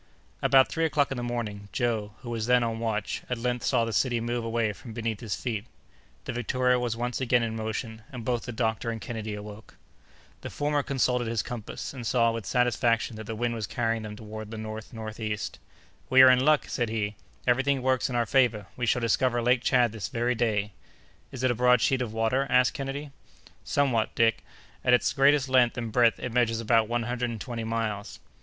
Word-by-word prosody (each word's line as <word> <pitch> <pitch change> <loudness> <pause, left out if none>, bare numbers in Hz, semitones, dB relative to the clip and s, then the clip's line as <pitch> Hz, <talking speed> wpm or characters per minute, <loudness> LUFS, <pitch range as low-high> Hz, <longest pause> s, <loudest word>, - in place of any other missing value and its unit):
About 135 -1 +5
three 165 - -2
o'clock 145 -3 +2
in 135 - -2
the - - -3
morning, 110 -4 -4
Joe, 110 -3 -1
who 120 -2 -7
was 115 -1 -2
then 125 0 +4
on 115 -1 -2
watch, 110 -3 -2
at 125 - -1
length 125 0 -2
saw 115 - +2
the 115 - -4
city 120 -1 +1
move 120 +1 -2
away 115 -2 0
from 115 +2 -11
beneath 115 -2 -3
his 110 -4 -3
feet. 110 -4 -3 0.6
The - - -4
Victoria 125 +1 +1
was 120 -2 -2
once 120 +2 -2
again 125 -2 +3
in 115 -1 -2
motion, 110 0 -4
and 125 -4 -7
both 120 -1 -1
the 120 - -5
doctor 110 0 -1
and 115 -1 -3
Kennedy 110 -2 -5
awoke. 105 +1 -10 0.6
The - - -6
former 145 0 0
consulted 125 -3 0
his 115 -2 -1
compass, 120 +1 -6
and 120 -4 -6
saw, 115 -2 +3
with 115 -4 -5
satisfaction, 120 -2 +1
that 110 - -7
the 110 - -4
wind 120 +1 -1
was 110 -4 -4
carrying 115 -1 -1
them 105 -1 -7
toward 110 0 -8
the 110 - -7
north 110 0 -7
northeast. 110 -2 -5 0.5
"We 130 0 +8
are 130 - +9
in 125 0 +3
luck!" 150 0 +4
said 120 -4 -1
he; 105 -2 -2 0.3
"every 125 +1 +3
thing 135 -1 0
works 130 0 +1
in 125 - -3
our 120 -1 +2
favor: 115 -6 +2
we 125 -1 -2
shall 125 - +2
discover 120 +2 +2
Lake 125 +1 +3
Tchad 125 -3 +3
this 110 -3 -5
very 120 0 0
day." 110 -3 0 0.6
"Is 130 -1 -6
it 130 - +3
a - - +2
broad 125 +1 +4
sheet 130 +2 +2
of 120 -4 -2
water?" 115 +5 0
asked 125 -1 +4
Kennedy. 140 +1 -5 0.5
"Somewhat, 130 -6 +1
Dick. 115 -1 +2 0.4
At 125 - +6
its - - 0
greatest 140 0 +4
length 125 -2 +3
and 115 -2 -3
breadth, 120 0 +4
it 125 - -5
measures 115 -2 +2
about 115 -1 +3
one 120 +1 -1
hundred 120 +1 -2
and 115 -2 -5
twenty 115 0 -5
miles." 110 -2 -3
120 Hz, 215 wpm, -27 LUFS, 110-125 Hz, 0.6 s, are